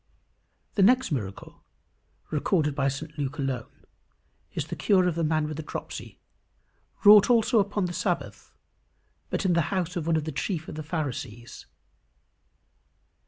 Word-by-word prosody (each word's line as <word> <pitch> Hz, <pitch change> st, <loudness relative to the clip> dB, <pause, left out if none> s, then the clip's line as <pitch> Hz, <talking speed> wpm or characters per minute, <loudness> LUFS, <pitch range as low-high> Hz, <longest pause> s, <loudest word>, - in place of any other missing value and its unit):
The 200 Hz, -, +1 dB
next 255 Hz, +4 st, +4 dB
miracle 100 Hz, -9 st, -5 dB, 0.7 s
recorded 150 Hz, 0 st, +1 dB
by 135 Hz, -1 st, 0 dB
St 150 Hz, +3 st, -4 dB
Luke 145 Hz, +1 st, -3 dB
alone 135 Hz, -4 st, -4 dB, 0.7 s
is -, -, -3 dB
the -, -, -6 dB
cure 185 Hz, -3 st, +3 dB
of 180 Hz, -, +1 dB
the 165 Hz, +1 st, -1 dB
man 155 Hz, -1 st, +1 dB
with 155 Hz, -1 st, -5 dB
the -, -, -3 dB
dropsy, 150 Hz, -, -7 dB, 0.9 s
wrought 210 Hz, +1 st, +8 dB
also 235 Hz, -1 st, +4 dB
upon 200 Hz, -1 st, 0 dB
the 175 Hz, -, -4 dB
Sabbath, -, -, -3 dB, 0.8 s
but -, -, -2 dB
in 180 Hz, -, +3 dB
the 170 Hz, -, +3 dB
house 185 Hz, -2 st, -2 dB
of 165 Hz, -2 st, -3 dB
one 165 Hz, -, +3 dB
of 155 Hz, -, -1 dB
the 155 Hz, -, -4 dB
chief 160 Hz, +2 st, -3 dB
of -, -, -7 dB
the 155 Hz, -, -5 dB
Pharisees. 135 Hz, -7 st, -5 dB
160 Hz, 155 wpm, -27 LUFS, 145-190 Hz, 0.9 s, wrought